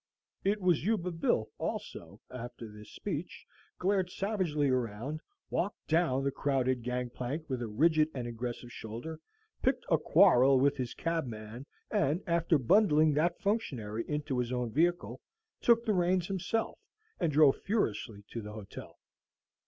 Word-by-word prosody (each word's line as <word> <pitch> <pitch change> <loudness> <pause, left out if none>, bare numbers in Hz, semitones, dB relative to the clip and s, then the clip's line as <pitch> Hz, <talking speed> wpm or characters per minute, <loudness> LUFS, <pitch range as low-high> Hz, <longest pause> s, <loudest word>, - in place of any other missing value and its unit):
It 205 +2 +1
was 180 -6 +2
Yuba 190 -3 0
Bill, 165 -9 0
also, - - -5
after 120 -1 -7
this 105 0 -12
speech, - - -5 0.3
glared 190 -1 +1
savagely 180 -8 0
around, 130 +4 -2 0.3
walked 195 +3 -2
down 160 -5 +2
the 140 - +1
crowded 130 -3 0
gang 125 0 -3
plank 140 +7 -4
with 130 -3 -3
a 120 - -2
rigid 155 +7 +3
and 125 -2 -3
aggressive 120 +1 -5
shoulder, 120 +9 -7 0.4
picked - - +1
a - - +5
quarrel 135 -8 +5
with 140 +2 +3
his 125 -2 -4
cabman, 125 -6 -4 0.2
and, 150 +8 +1
after 170 -2 +2
bundling 155 - +4
that 160 +4 +1
functionary 120 - -1
into 150 -3 -1
his 125 0 -1
own 125 -2 -2
vehicle, 175 +7 0 0.4
took 235 0 +4
the 215 - +2
reins 180 -1 +2
himself, 195 +4 -2 0.4
and 165 - +1
drove 145 -2 +5
furiously 115 - -1
to 115 - -4
his 105 - -7
hotel. 105 -2 -9
145 Hz, 145 wpm, -31 LUFS, 120-175 Hz, 0.4 s, a